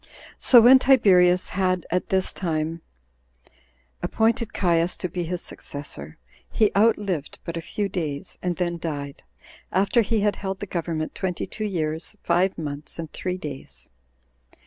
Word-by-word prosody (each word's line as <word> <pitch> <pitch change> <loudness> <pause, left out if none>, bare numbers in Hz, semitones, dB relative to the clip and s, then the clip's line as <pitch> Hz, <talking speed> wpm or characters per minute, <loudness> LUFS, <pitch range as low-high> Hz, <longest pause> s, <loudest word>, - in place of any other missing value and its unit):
10. - - -23 0.3
So 245 -3 +7
when 255 +3 +8
Tiberius 185 -9 +5
had 185 -2 0
at 180 +1 -1
this 190 -1 +1
time 165 -2 -2 1.2
appointed 230 +1 +1
Caius 170 -1 +1
to - - -3
be 175 0 -4
his 180 +1 -3
successor, 80 - -8 0.3
he 215 -2 +3
outlived 200 -7 +1
but 170 - -4
a 165 - -3
few 205 +4 -3
days, 170 -3 -4
and 180 -1 -1
then 175 -1 -2
died, 145 -4 -5 0.5
after 200 +5 +3
he 220 0 0
had 205 0 +1
held 190 -1 -4
the - - -4
government 165 -4 -3
twenty 185 -2 -3
two 215 - -5
years 160 -4 -3
five 180 +2 +2
months 150 -2 -5
and 165 -2 -7
three 185 0 -3
days. 135 - -9
180 Hz, 150 wpm, -24 LUFS, 160-200 Hz, 1.2 s, when